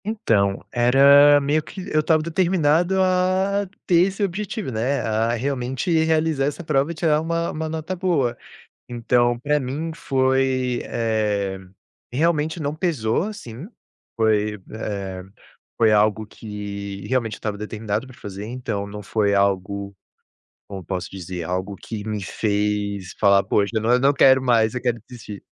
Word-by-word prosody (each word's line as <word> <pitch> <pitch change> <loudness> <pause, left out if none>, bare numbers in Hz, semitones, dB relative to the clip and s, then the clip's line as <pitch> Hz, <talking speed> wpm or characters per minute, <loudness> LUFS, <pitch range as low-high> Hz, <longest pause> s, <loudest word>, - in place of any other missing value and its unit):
Então, 110 - 0
era 140 +4 +6
meio 145 +2 +1
que 185 +4 -9
eu 155 - +4
estava 155 0 +2
determinado 170 +1 +2
a 185 +2 +1 0.2
ter 175 +1 +4
esse 195 +2 -3
objetivo, 200 - -3
né, 125 +5 0
a 110 +1 0
realmente 130 +4 -2
realizar 160 -3 +1
essa 145 +4 -3
prova 145 -2 +1
e - - -6
tirar 155 -2 +2
uma 165 +1 -1
uma 160 0 -4
nota 160 +3 -4
boa. 170 -10 0 0.5
Então 120 0 +1
para 150 +3 +1
mim 145 +5 -4
foi 130 -3 0
eh, 105 -4 -1 0.6
realmente 160 +2 +1
não 145 0 -2
pesou, 155 - 0
assim, 180 - -7 0.5
foi, 105 -2 +2 0.2
eh, 100 -4 -5 0.5
foi 110 -2 +4
algo 105 +1 +2
que 100 -2 -7
realmente 120 -4 0
eu - - -15
estava 105 -2 -3
determinado 105 +2 -4
para 130 - -14
fazer, 100 0 -7
então 110 -4 -4
não 105 0 -8
foi 100 0 +1
algo 100 0 0 0.7
como 95 -2 -7
posso 90 +1 -4
dizer, 90 -2 -6
algo 95 +4 -3
que 110 +1 -7
me 105 -2 -3
fez 100 -1 -2
falar: 100 -1 +4
"Poxa, 100 +1 +1
eu 110 - +1
não 115 +2 +1
e - - +6
eu - - +2
não 140 +1 +5
quero 130 -1 +5
mais, 115 -3 +2
eu 125 - -3
quero 120 -2 -1
desistir". 110 -5 -9
120 Hz, 155 wpm, -22 LUFS, 105-155 Hz, 0.7 s, era